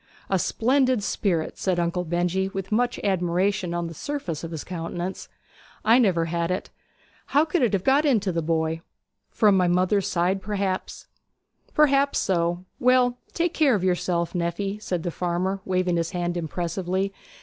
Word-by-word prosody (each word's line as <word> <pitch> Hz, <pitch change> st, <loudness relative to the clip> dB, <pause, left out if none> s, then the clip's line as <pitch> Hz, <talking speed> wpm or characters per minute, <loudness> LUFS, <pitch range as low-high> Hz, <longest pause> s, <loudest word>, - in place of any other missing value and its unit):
'A 190 Hz, -, +3 dB
splendid 255 Hz, +2 st, +2 dB
spirit!' 175 Hz, -6 st, -1 dB
said 185 Hz, -2 st, 0 dB
Uncle 175 Hz, +1 st, 0 dB
Benjy, 175 Hz, +3 st, 0 dB
with 195 Hz, 0 st, -6 dB
much 240 Hz, +3 st, +1 dB
admiration 185 Hz, 0 st, +1 dB
on 175 Hz, 0 st, -2 dB
the 165 Hz, -, -6 dB
surface 180 Hz, -, -4 dB
of 165 Hz, -, -4 dB
his 160 Hz, -3 st, -5 dB
countenance. 175 Hz, +1 st, -5 dB, 0.6 s
'I 230 Hz, +3 st, +6 dB
never 180 Hz, -8 st, +3 dB
had 170 Hz, 0 st, -1 dB
it. 185 Hz, +2 st, -3 dB, 0.6 s
How 290 Hz, +3 st, +3 dB
could 325 Hz, +2 st, 0 dB
it 235 Hz, -5 st, +2 dB
have 190 Hz, -2 st, +1 dB
got 275 Hz, +3 st, +4 dB
into 220 Hz, -10 st, +2 dB
the 165 Hz, -1 st, -1 dB
boy?' 160 Hz, 0 st, -1 dB, 0.5 s
'From 210 Hz, -3 st, +4 dB
my 180 Hz, -1 st, +3 dB
mother's 185 Hz, +3 st, +2 dB
side, 185 Hz, +3 st, 0 dB
perhaps.' 195 Hz, -1 st, -3 dB, 0.7 s
'Perhaps 280 Hz, -2 st, +4 dB
so. 175 Hz, -1 st, 0 dB
Well, 250 Hz, 0 st, +3 dB, 0.2 s
take 340 Hz, 0 st, 0 dB
care 285 Hz, -6 st, +4 dB
of 190 Hz, -, -2 dB
yourself, 175 Hz, -2 st, 0 dB
nephy,' 190 Hz, +4 st, -2 dB
said 180 Hz, -5 st, -2 dB
the 175 Hz, -, -2 dB
farmer, 180 Hz, +3 st, -1 dB
waving 185 Hz, -2 st, +1 dB
his 165 Hz, -1 st, -1 dB
hand 175 Hz, -1 st, -2 dB
impressively. 180 Hz, +3 st, -2 dB
185 Hz, 160 wpm, -25 LUFS, 175-210 Hz, 0.7 s, I